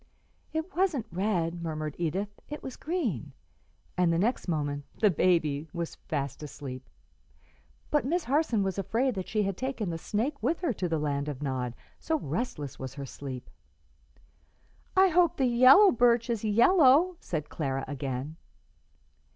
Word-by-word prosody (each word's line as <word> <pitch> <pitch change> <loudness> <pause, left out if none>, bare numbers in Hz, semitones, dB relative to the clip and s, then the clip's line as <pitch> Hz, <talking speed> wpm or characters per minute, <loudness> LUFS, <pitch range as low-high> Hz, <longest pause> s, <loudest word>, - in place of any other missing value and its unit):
"It 320 +4 -4
wasn't 345 - +1
red," 175 -3 -1
murmured 155 -2 -4
Edith; 185 +5 -1 0.2
"it 295 - -6
was 260 - -6
green;" 290 - -3 0.6
and 180 -2 +3
the 165 - +2
next 220 +6 0
moment 145 -4 -1 0.2
"the 210 -3 +5
baby" 155 -4 +1
was 170 -2 -3
fast 140 -3 -4
asleep, 135 -3 -8 1.0
but 295 - +3
Miss 335 +6 0
Harson 275 -7 +1
was 190 0 -2
afraid 245 +7 0
that 190 -3 -5
she 215 -1 0
had 195 -1 -1
taken 245 -5 -3
the 165 - -4
snake 240 - -2
with 335 - 0
her 335 -9 0
to 185 -3 -3
the 165 - +1
land 145 -1 -1
of 145 0 -5
Nod, 125 -3 -2 0.2
so 320 - 0
restless 150 - -4
was 130 0 -6
her 140 -1 -5
sleep. 130 -1 -7 1.5
"I 380 0 +7
hope 350 0 +3
the 265 - +2
yellow 255 - +7
birch 235 0 +3
is 225 -2 -2
yellow," 280 - +5
said 155 -3 -4
Clara 135 -3 -2
again. 140 +2 -4
190 Hz, 155 wpm, -29 LUFS, -, 1.5 s, I